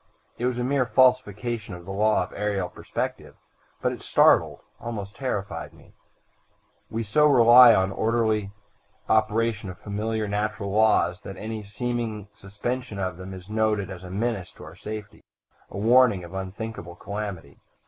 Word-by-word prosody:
It 120 - +1
was 125 -1 -1
a 125 - -1
mere 130 -1 +1
falsification 120 -5 +1
of 85 -1 -12
the 95 - -6
law 105 0 +2
of 90 - -10
aerial 100 -3 -2
perspective, - - -5 0.5
but - - +2
it - - -7
startled, - - +3 0.2
almost 105 -4 -6
terrified 105 -7 -4
me. - - -20 1.0
We 115 +1 -3
so 150 +8 +3
rely 125 -2 +8
upon 95 -4 +4
the 95 - -7
orderly 110 -3 +1 0.6
operation 110 -1 +1
of 90 - -8
familiar 110 +1 -3
natural 105 -1 -2
laws 100 -4 +3
that 95 - -8
any 110 0 -5
seeming 110 0 -4
suspension 105 +4 -5
of 95 -3 -3
them 95 +1 -8
is 95 -1 -10
noted 105 -2 0
as 95 -1 -8
a 90 - -8
menace 100 -1 -2
to - - -13
our 80 +1 -11
safety, 105 +2 -8 0.5
a - - -8
warning 115 -2 +4
of 85 - -10
unthinkable 95 -1 -6
calamity. 100 -8 -6
105 Hz, 160 wpm, -25 LUFS, 95-115 Hz, 1.0 s, rely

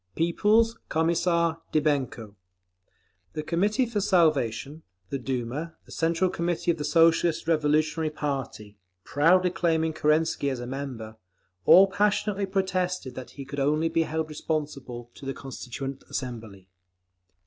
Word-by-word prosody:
_ - - -42
People's 215 +7 +2
Commissar 170 0 +1
DYBENKO. 135 -8 0 1.0
The 155 - -4
Committee 205 - +1
for 220 -3 -2
Salvation, 155 - +1 0.3
the 140 - -2
Duma, 130 +6 -4
the - - -17
Central 170 +2 +1
Committee 170 0 0
of 165 - -4
the - - -2
Socialist 165 +2 +3
Revolutionary 155 0 +1
party—proudly 135 - -1
claiming 160 -2 0
Kerensky 155 -1 +1
as 130 -2 -3
a 120 - -5
member—all 110 - +1
passionately 205 0 0
protested 185 -6 -1
that 130 0 -8
he 140 - -6
could 140 +1 -6
only 150 +4 +2
be 165 0 +1
held 160 0 -2
responsible 140 -6 -4
to - - -15
the 135 0 -4
Constituent 135 0 -7
Assembly. 110 -7 -6
155 Hz, 125 wpm, -26 LUFS, 130-170 Hz, 1.0 s, Socialist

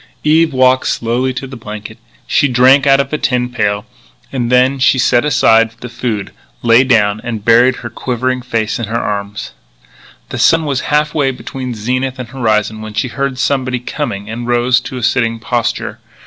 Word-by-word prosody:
Eve 160 +1 +3
walked 130 -1 +3
slowly 120 +3 0
to 130 +1 -5
the 130 0 -9
blanket. 110 -1 -9 0.3
She 145 - +2
drank 130 +2 +4
out 135 0 +5
of 140 - -1
the 150 - -2
tin 125 -1 0
pail. 105 -4 -1 0.5
Then 125 +1 +2
she 130 0 +3
set 120 -1 +3
aside 115 -6 +3
the 125 - -8
food, 110 -5 -3 0.3
lay 115 +2 +5
down, 110 -5 +2
and 110 -3 -5
buried 120 +2 +5
her - - -3
quivering 130 0 -2
face 115 -3 -2
in 120 - -2
her 115 +2 -2
arms. 100 -1 -4 0.8
The - - -5
sun 165 -1 +4
was 140 -3 -1
half 150 0 +1
way 145 -4 +1
between 130 -1 -6
zenith 130 +4 -2
and 125 -3 -7
horizon 110 -4 -1
when 110 -1 -8
she 115 +4 -1
heard 135 +2 -3
somebody 130 -2 0
coming, 120 -6 -4
and 120 +2 -5
rose 120 +1 +2
to 130 - -7
a 125 - -5
sitting 115 -1 +1
posture. 120 +1 -2
125 Hz, 180 wpm, -15 LUFS, 115-130 Hz, 0.8 s, out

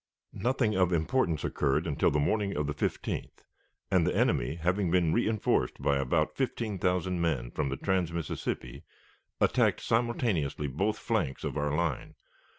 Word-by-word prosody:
Nothing 120 -3 0
of 90 -1 +3
importance 85 - +1
occurred 75 +3 0
until 75 -4 +2
the 75 - 0
morning 100 +6 0
of 75 - 0
the 75 - -2
15th, 75 - -3 0.5
and - - +3
the - - 0
enemy, 60 +5 +1
having 90 +3 0
been 85 -2 +3
reënforced 110 -3 +1
by 70 - +2
about 75 +4 0
fifteen 115 -6 -2
thousand 90 0 0
men 70 -8 -1
from 75 -3 -1
the 65 - -3
trans 95 -1 0
Mississippi, 75 -6 -4 0.6
attacked - - +3
simultaneously 115 - 0
both 95 +11 -1
flanks 100 - -1
of - - -3
our 75 0 0
line. 85 -6 -2
85 Hz, 155 wpm, -29 LUFS, 75-105 Hz, 0.6 s, of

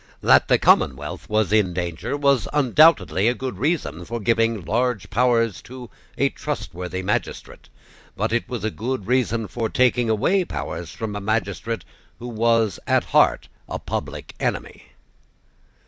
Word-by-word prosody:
That - - +5
the - - +4
commonwealth 65 - +1
was 110 0 +1
in 95 -5 +2
danger 90 - -3
was 140 -4 +2
undoubtedly 145 - +4
a 120 - +2
good 125 -7 -5
reason 120 - -1
for 115 +6 -5
giving 115 -2 +1
large 120 - -1
powers 115 -6 +2
to 125 -2 -10 0.3
a - - +2
trustworthy 90 +1 -5
magistrate: 100 +2 -4 0.5
but - - -1
it 120 - -1
was 120 -5 -4
a 110 - -1
good 115 -1 -4
reason 115 -3 0
for 115 0 -3
taking 125 -2 +2
away 180 - +2
powers 85 - -5
from 110 +2 -5
a 105 - -4
magistrate 110 -1 -2 0.3
who 120 - -7
was 115 -3 +1
at - - +3
heart - - +4 0.2
a - - -3
public - - -5
enemy. - - -3
115 Hz, 145 wpm, -22 LUFS, 100-125 Hz, 0.5 s, That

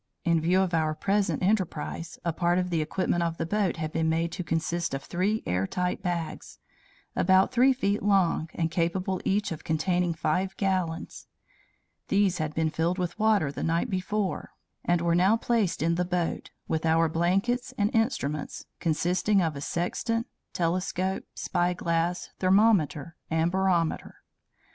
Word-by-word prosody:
In 170 -2 +3
view 180 +4 +3
of 185 -2 -1
our 155 -1 +1
present 200 +2 0
enterprise, 180 -4 -1
a 170 - 0
part 175 +1 +1
of 180 0 -1
the 165 -2 +1
equipment 175 +2 0
of 165 -1 -1
the 165 - -2
boat 200 0 0
had 155 -1 -3
been 160 0 +1
made 165 +1 0
to 180 - -4
consist 165 -1 -1
of 135 - -5
three 200 +5 -1
airtight 95 - -1
bags, 175 -4 -4 0.6
about 190 +3 +4
three 255 +2 +5
feet 210 -6 0
long, 190 -5 +2
and 165 -1 -1
capable 180 +3 -1
each 205 0 0
of 160 - -6
containing 175 +2 0
five 185 +5 -1
gallons. 185 -4 -2 0.8
These 200 -3 +2
had 155 -1 -2
been 160 -1 +1
filled 165 +3 0
with 180 +3 -3
water 210 -9 +3
the - - -6
night 170 +8 0
before, 190 +1 -2 0.3
and 175 -1 +1
were 170 0 +2
now 190 +6 +4
placed 225 -9 0
in 165 +1 +2
the 175 +1 +1
boat, 175 -1 -2 0.2
with 160 -1 -1
our 165 0 +3
blankets 195 +11 0
and 205 +1 +1
instruments, 155 - -1
consisting 180 +5 +1
of 165 -4 0
a 140 - -6
sextant, 230 +9 -1 0.3
telescope, 185 +2 -1
spyglass, 175 0 -1
thermometer, 185 -6 +2
and 160 +1 +1
barometer. 185 -3 0
175 Hz, 155 wpm, -27 LUFS, 165-190 Hz, 0.8 s, three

